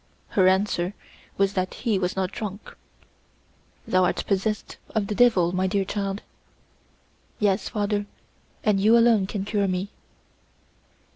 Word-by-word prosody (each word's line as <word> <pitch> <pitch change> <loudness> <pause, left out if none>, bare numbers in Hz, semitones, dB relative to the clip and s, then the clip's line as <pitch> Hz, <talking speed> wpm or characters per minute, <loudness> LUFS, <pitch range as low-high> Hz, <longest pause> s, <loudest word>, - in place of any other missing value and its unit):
Her 185 -2 +3
answer 190 0 +1 0.4
was 195 0 +2
that 185 -1 -2
he 220 -5 0
was 180 -1 -1
not 190 -1 -1
drunk. 205 -1 -7 1.1
"Thou 185 0 +3
art - - -1
possessed 210 +2 -1 0.2
of 215 -2 +1
the 210 - -3
devil, 205 -7 +4
my 185 +1 0
dear 195 0 0
child." 200 0 -3 1.1
"Yes, 200 -2 +1
father, 205 -1 -1 0.6
and 210 -2 +2
you 220 +4 +5
alone 230 -4 +4
can 200 -1 -4
cure 205 -1 0
me." 185 +1 -2
200 Hz, 135 wpm, -25 LUFS, 190-210 Hz, 1.1 s, you